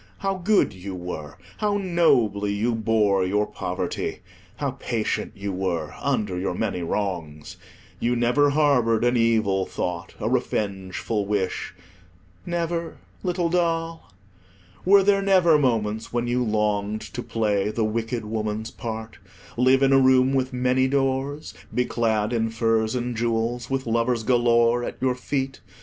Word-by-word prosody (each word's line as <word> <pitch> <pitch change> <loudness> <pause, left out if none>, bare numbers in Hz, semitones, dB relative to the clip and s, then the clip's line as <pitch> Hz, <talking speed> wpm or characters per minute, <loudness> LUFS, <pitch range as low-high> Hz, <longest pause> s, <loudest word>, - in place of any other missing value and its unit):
How 195 -1 -1
good 190 - +2
you 95 +1 -7
were! 90 -2 -7 0.2
How 205 -1 +1
nobly 120 - +2
you 115 +4 0
bore 110 -3 +2
your 105 +3 +1
poverty. - - -4 0.3
How 140 -2 -2
patient 120 -4 -2
you 100 0 -4
were 90 -4 -2
under 95 -4 -1
your 90 -1 -2
many 100 -3 -2
wrongs. 85 -5 -3 0.4
You 120 +1 +1
never 125 +5 +3
harboured 140 -7 +3
an 120 +1 +3
evil 110 -5 +2
thought, 85 -1 -4
a - - -2
revengeful 100 +1 -2
wish—never, 95 - -4 0.2
little 180 -2 0
doll? 165 - -1 0.7
Were 195 +1 +6
there 195 0 +3
never 185 -5 +4
moments 110 -5 0
when 120 0 -1
you 125 +1 0
longed 105 -1 0
to 120 - -3
play 105 -4 0
the 110 +1 -1
wicked 115 +1 -2
woman's 110 +1 -3
part, 110 -1 -6 0.4
live 130 +2 +4
in 135 0 +4
a 135 - +6
room 130 0 +4
with 130 -1 0
many 125 +1 +2
doors, 135 +2 -1 0.2
be 125 - +1
clad 110 -2 0
in 115 -1 +1
furs 115 0 +1
and 125 -1 -2
jewels, 115 +1 -1
with 135 -1 -1
lovers 115 0 0
galore 120 0 +3
at - - -5
your 130 -1 +1
feet? 135 +1 -3
115 Hz, 140 wpm, -24 LUFS, 105-135 Hz, 0.7 s, Were